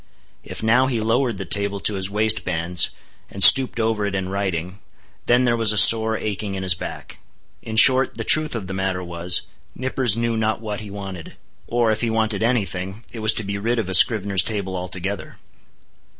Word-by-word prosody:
If - - -9
now 120 +4 +2
he 120 -3 -3
lowered 115 +1 -1
the 95 - -7
table 100 +2 -2
to 105 - +1
his 95 -1 -4
waistbands, 90 -5 0 0.4
and 100 - +1
stooped 130 0 +8
over 110 -2 -2
it 100 - -5
in 95 -1 -4
writing, 95 -1 -5 0.5
then 125 +1 +2
there 120 -1 +1
was 115 -2 +2
a 105 - -1
sore 110 +1 +6
aching 100 -1 -5
in 95 - -6
his 95 -1 +3
back. 85 - -10 0.4
In 110 - -8
short, 130 +3 +4
the - - -4
truth 155 -3 +4
of 110 -4 -5
the 95 - -8
matter 95 -1 -4
was, 85 0 -2 0.3
Nippers 130 -3 -1
knew 115 0 -2
not 110 0 -2
what 105 -2 -6
he 105 - -10
wanted. 95 -4 -9 0.3
Or, 120 -2 0
if 110 - -3
he 120 - -2
wanted 110 -2 -2
any 115 -2 0
thing, 95 +4 -8
it 115 - -8
was 110 0 +2
to 110 - -3
be 100 0 -5
rid 115 +4 -2
of 110 -5 -4
a - - -4
scrivener's 100 -1 +4
table 100 -1 -4
altogether. 90 +2 -7
105 Hz, 200 wpm, -20 LUFS, 95-115 Hz, 0.5 s, stooped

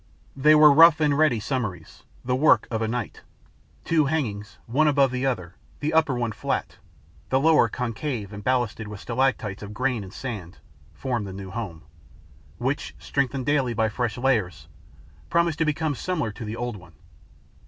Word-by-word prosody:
They 150 +3 +5
were 150 -1 +8
rough 165 +1 +7
and 150 -2 +2
ready 150 -6 +3
summaries, 110 -4 -4 0.2
the 125 0 +1
work 145 +4 +4
of 110 -1 -1
a 110 - 0
night. 120 +2 -4 0.6
Two 160 -3 +3
hangings, 110 -9 -3
one 145 +7 +2
above 140 -3 +3
the 130 +1 -1
other, 90 -9 -3 0.3
the 150 +1 -2
upper 160 -4 +3
one 120 -2 -1
flat, - - -3 0.5
the 130 - +3
lower 150 -5 +4
concave 115 -2 -4
and 100 0 -8
ballasted 120 -3 0
with 105 -1 -8
stalactites 115 -5 -1
of 105 0 -8
grains 125 -3 -1
of 95 - -12
sand, 105 -10 -6 0.3
formed 120 -6 -3
the 95 - -7
new 95 -1 -8
home, 95 -8 -6 0.7
which, 130 +4 -3
strengthened 135 -2 -2
daily 140 -5 +1
by 110 0 +1
fresh 120 +1 -2
layers, 100 - 0 0.6
promised 170 -2 +1
to 160 - +2
become 155 0 0
similar 150 -5 -2
to 110 +3 -8
the 105 +1 -5
old 120 -2 -4
one. 85 -3 -16
125 Hz, 170 wpm, -25 LUFS, 105-145 Hz, 0.7 s, were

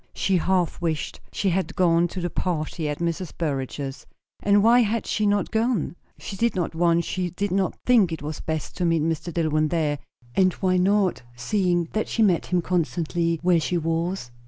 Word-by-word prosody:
She 190 -2 +1
half 180 0 0
wished 160 -3 -2
she 200 - 0
had 190 +2 -1
gone 175 -2 +3
to 185 - -6
the 175 -1 -2
party 155 -3 -2
at 150 - -3
Mrs. 170 0 -3
Burrage's. 135 -3 -3 0.3
And 205 0 +4
why 235 +2 +6
had 230 -1 +1
she 215 -1 0
not 205 -1 +1
gone? 225 -6 0 0.2
She 200 - -7
did 235 +4 +1
not 175 -3 -1
want, 170 0 +2
she 180 0 -2
did 200 +3 -3
not 190 0 0
think 225 -8 +4
it 160 -3 -5
was 150 +1 -5
best, 160 -1 -4
to 180 - 0
meet 165 -2 +2
Mr. 165 +1 -2
Dillwyn 155 -2 +1
there. 150 -3 0 0.3
And 185 +2 +3
why 185 -1 +1
not, 195 +1 +2
seeing 175 - 0
that 215 - 0
she 225 - +1
met 185 -5 +2
him 180 -1 +1
constantly 170 0 0
where 175 -1 +4
she 175 +3 -1
was? 165 -3 -2
175 Hz, 190 wpm, -24 LUFS, 160-190 Hz, 0.3 s, why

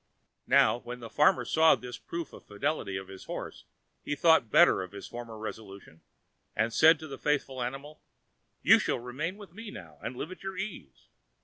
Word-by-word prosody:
Now, 120 - +5
when 120 0 -8
the 115 -2 -9
farmer 150 +5 +4
saw 160 0 +5
this 125 -1 -8
proof 170 -2 -6
of - - -13
the 100 - -13
fidelity 100 -4 -1
of 95 0 -7
his 95 -1 -11
horse, - - -7 0.4
he 145 - -3
thought 160 -6 +4
better - - +6
of 95 +1 -8
his 100 - -8
former 120 -2 -8
resolution, 100 -6 -9 0.5
and 110 +2 0
said 160 +4 +7
to 155 - -7
the 140 - -8
faithful 135 -3 -1
animal: 135 +5 -6 0.6
"You - - +7
shall - - 0
remain 145 +10 -4
with 200 -5 -13
me 225 +2 -8
now, 80 - -11
and - - -5
live 155 +7 -5
at 185 - -10
your 190 -1 -6
ease." 185 - -7
125 Hz, 195 wpm, -29 LUFS, 110-160 Hz, 0.6 s, said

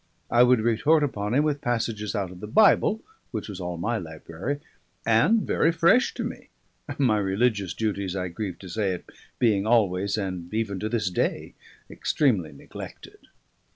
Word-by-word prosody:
I 120 - +5
would 125 -2 +5
retort 120 +8 +3
upon 105 -5 -1
him 145 - +4
with 150 -2 0
passages 115 -3 -2
out 95 -3 -2
of 90 - -11
the 105 - -7
Bible, 215 - +4 0.3
which 110 -3 -5
was 100 -3 -7
all 90 -1 -4
my 110 +7 -1
library 85 - -5 0.5
and 115 - +4
very 165 - +2
fresh 170 +9 +3
to - - -3
me, - - -7 0.5
my 120 -7 +3
religious 100 -1 0
duties 100 -4 -2
(I 90 -1 -2
grieve 95 +1 -5
to 95 - -9
say 95 +1 -1
it) 90 - -7 0.3
being 105 -4 +2
always 100 -3 +2
and 90 -4 -4
even 105 -4 -1
to 110 - -2
this 110 -5 -1
day - - -1 0.3
extremely 105 - 0
neglected. 70 - -11
105 Hz, 165 wpm, -26 LUFS, 95-120 Hz, 0.5 s, I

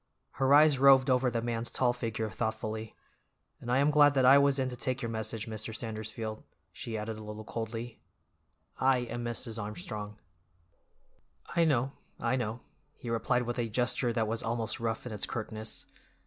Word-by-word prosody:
Her 135 0 0
eyes 145 -1 +7
roved 135 -1 +6
over 125 0 +3
the 115 -1 -2
man's 115 0 -2
tall 125 -2 +2
figure 115 -2 -3
thoughtfully. 110 -1 -3 0.6
"And 120 - -5
I 125 - +4
am 145 +2 +4
glad 145 -1 +6
that 130 -2 +4
I 135 +2 +8
was 140 0 +3
in 130 -1 0
to 125 - -6
take 130 +1 -2
your 115 - -2
message, 110 -1 -3
Mr. 110 0 -4
Sandersfield," 110 -1 -5 0.3
she 115 -2 -5
added 110 +1 -4
a - - -8
little 105 0 -7
coldly. 115 0 -5 0.8
"I 130 -1 +3
am 120 0 -4
Mrs. 115 -1 -2
Armstrong." 105 +1 -5 1.4
"I 170 -1 +4
know, 135 -4 +2 0.3
I - - +1
know," 120 -1 -3 0.4
he 120 - -6
replied 125 +2 +1
with 120 +1 -3
a 115 -1 -1
gesture 125 +2 +1
that 115 -2 0
was 115 +1 -2
almost 115 -1 -2
rough 115 0 -2
in 125 - -5
its 105 - -1
curtness. 110 -1 -4
115 Hz, 175 wpm, -30 LUFS, 110-130 Hz, 1.4 s, I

